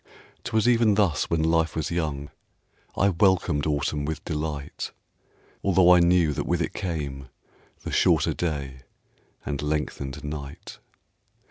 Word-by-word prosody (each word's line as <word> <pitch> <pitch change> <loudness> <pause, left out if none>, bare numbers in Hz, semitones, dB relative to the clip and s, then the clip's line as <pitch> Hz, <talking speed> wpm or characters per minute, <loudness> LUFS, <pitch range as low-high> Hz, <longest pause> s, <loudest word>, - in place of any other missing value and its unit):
'Twas 110 0 +1
even 115 -3 +4
thus 95 -7 +1
when 80 -1 +1
life 80 0 +1
was 80 0 -2
young, 75 -4 -3 0.7
I 100 - +4
welcomed 85 -5 +2
Autumn 75 0 -1
with 80 +1 -4
delight; 75 -3 -4 0.7
Although 90 -2 +5
I 90 - +6
knew 85 -3 +3
that - - -3
with - - +1
it - - -2
came 70 -7 -4 0.5
The - - -5
shorter - - +3
day 70 -6 -3 0.7
and 70 -2 -3
lengthened 75 -3 -3
night. 75 -2 -7
80 Hz, 130 wpm, -25 LUFS, 75-90 Hz, 0.7 s, I